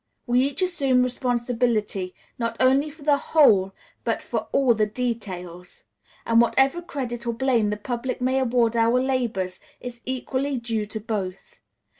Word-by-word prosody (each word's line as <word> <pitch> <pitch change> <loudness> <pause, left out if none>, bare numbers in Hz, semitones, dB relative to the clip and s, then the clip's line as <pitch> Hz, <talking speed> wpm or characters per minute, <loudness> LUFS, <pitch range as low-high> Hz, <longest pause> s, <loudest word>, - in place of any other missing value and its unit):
We 245 0 +3
each 285 +7 -1
assume 275 -9 +2
responsibility, 240 -6 -1 0.2
not 230 -1 -2
only 270 +4 +3
for 300 0 -14
the 290 -1 +4
whole, 210 -12 +4 0.3
but - - 0
for - - -3
all 270 -3 +4
the 215 -1 +1
details, 190 -7 -5 0.4
and 230 0 +5
whatever 270 +7 +3
credit 240 -7 -5
or 235 - 0
blame 235 -3 +1
the 210 - -2
public 245 +4 -4
may 260 +1 +1
award 240 -2 +2
our 230 +2 +3
labors 240 -8 -1 0.2
is 240 -1 -8
equally 260 +2 -2
due 225 -3 -2
to 220 - -5
both. 200 -4 -5
240 Hz, 150 wpm, -24 LUFS, 220-260 Hz, 0.4 s, and